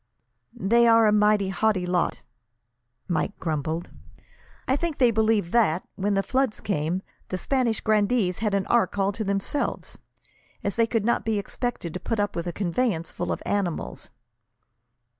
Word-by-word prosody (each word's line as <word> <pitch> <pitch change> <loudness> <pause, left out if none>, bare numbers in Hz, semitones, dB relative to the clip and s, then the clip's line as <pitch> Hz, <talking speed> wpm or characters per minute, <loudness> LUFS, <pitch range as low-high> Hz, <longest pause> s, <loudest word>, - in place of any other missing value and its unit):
"They 235 +5 +3
are 230 -1 +6
a 210 - +5
mighty 210 -2 +3
haughty 190 -1 +1
lot," 180 -1 0 0.8
Mike 175 +3 -1
grumbled. 160 +1 -3 0.8
"I 260 - +3
believe 330 +1 -2
they 225 -3 +3
think 170 - -13
that, 195 -8 +3
when 200 +1 -1
the 195 - +2
flood 260 -2 0
came, 175 0 -1 0.3
the 185 - -2
Spanish 245 0 0
grandees 210 -3 +2
had 210 -2 0
an 195 -1 0
ark 235 -3 +2
all 195 0 +2
to 215 +2 -4
themselves, 200 +8 -2 0.6
as 200 - -1
they 230 -1 +3
could 225 -3 0
not 235 - +1
be 220 -1 0
expected 205 -4 -4
to 180 - -4
put 225 +4 -2
up 205 -1 0
with 170 +1 -3
a - - -1
conveyance 175 -1 -1
full - - -3
of - - -3
animals." 195 -5 -2
205 Hz, 160 wpm, -25 LUFS, 185-230 Hz, 0.8 s, are